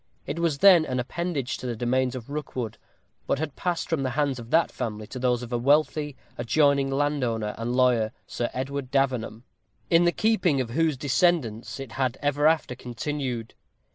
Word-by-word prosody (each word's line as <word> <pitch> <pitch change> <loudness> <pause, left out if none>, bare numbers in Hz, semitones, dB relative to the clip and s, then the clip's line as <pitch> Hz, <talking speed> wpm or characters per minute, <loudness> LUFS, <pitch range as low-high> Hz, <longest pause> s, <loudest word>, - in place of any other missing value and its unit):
It 145 +4 -4
was 165 -4 +1
then 180 0 +7
an 130 -4 -2
appendage 140 +1 -2
to 130 - -6
the 120 - -2
domains 125 +2 0
of 130 +2 -8
Rookwood, 125 -7 -4 0.5
but - - +1
had 145 -1 -4
passed 175 -2 -2
from 165 -4 0
the 130 - 0
hands 140 -4 +1
of 115 -1 -10
that 165 +4 +3
family 105 -1 -4
to 130 - -8
those 125 -1 +1
of 120 0 -7
a 120 - +1
wealthy 150 +2 +2 0.2
adjoining 140 +3 +3
landowner 135 -7 0
and 120 +2 -3
lawyer, 125 -4 +3
Sir 120 - -3
Edward 135 0 -4
Davenham, 125 -5 0 0.5
in 170 +1 +5
the 175 - +4
keeping 195 -9 +2
of 120 -3 -2
whose 160 +1 +1
descendants 140 - +1
it 135 -3 -7
had 130 -1 -1
ever 145 +1 +2
after 160 -5 +2
continued. 125 -1 -4
135 Hz, 180 wpm, -26 LUFS, 120-150 Hz, 0.5 s, then